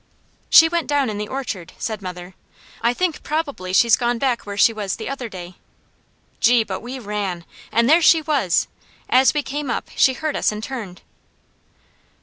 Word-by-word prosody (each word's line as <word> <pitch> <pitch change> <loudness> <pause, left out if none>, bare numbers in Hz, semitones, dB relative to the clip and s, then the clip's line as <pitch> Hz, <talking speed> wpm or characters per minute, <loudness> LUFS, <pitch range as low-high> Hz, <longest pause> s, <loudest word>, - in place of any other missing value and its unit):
"She 325 - +8
went 335 0 -2
down 285 -5 +1
in 205 - -5
the 210 - -4
orchard," 210 -10 -5
said 220 -2 -4
mother. 180 -1 -8 0.5
"I 235 +1 +3
think 340 +5 -2
probably 285 - -3
she's 225 +4 +5
gone 240 0 -1
back 245 -3 -1
where 200 0 -6
she 225 - +5
was 205 -3 -3
the 220 - -7
other 260 -3 -5
day." 180 -2 -9 0.8
Gee, 235 0 +4
but 190 -3 -5
we 250 +3 -7
ran! 200 -7 -4 0.3
And 235 +1 +2
there 320 +5 +5
she 325 0 +6
was! 290 - +1 0.4
As 260 +3 +5
we 295 - 0
came 285 0 -4
up, 240 - -3
she 260 - +4
heard 310 +3 -3
us - - +1
and 210 0 -6
turned. 220 -9 -7
235 Hz, 180 wpm, -21 LUFS, 200-275 Hz, 0.8 s, She